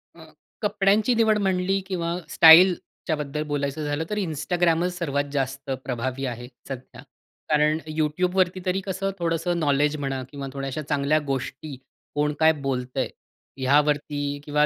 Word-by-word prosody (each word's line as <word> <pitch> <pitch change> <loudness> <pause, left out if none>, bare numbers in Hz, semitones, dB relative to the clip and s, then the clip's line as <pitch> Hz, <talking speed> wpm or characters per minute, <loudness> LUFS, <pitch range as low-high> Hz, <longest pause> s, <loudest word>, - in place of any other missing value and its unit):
अ, - - -13 0.4
कपड्यांची 210 +3 +2
निवड 220 -2 +3
म्हणली 190 -1 +1
किंवा 170 -2 -2
स्टाईलच्या 165 0 +6
बद्दल 150 0 -3
बोलायचं 145 +1 -2
झालं 145 +2 -1
तर 210 - -2
Instagramच 175 0 0
सर्वात 145 -4 -1
जास्त 135 0 -3
प्रभावी 130 +2 -3
आहे 120 -1 -5 0.2
सध्या. 130 -2 -8 0.5
कारण 150 0 +3 0.2
YouTubeवरती 180 +4 +1
तरी 185 +1 0
कसं 195 +1 -2
थोडंसं 170 +1 0
नॉलेज 145 -1 +2
म्हणा 135 -2 -3
किंवा 140 -2 -6
थोड्या 135 -1 -4
अशा 140 +4 -4
चांगल्या 145 +2 +2
गोष्टी 135 +2 -4 0.4
कोण 150 0 +1
काय 160 0 +6
बोलतंय? 125 -2 -1 0.5
यावरती 145 +1 +1
किंवा 150 0 +2
150 Hz, 135 wpm, -24 LUFS, 140-180 Hz, 0.5 s, स्टाईलच्या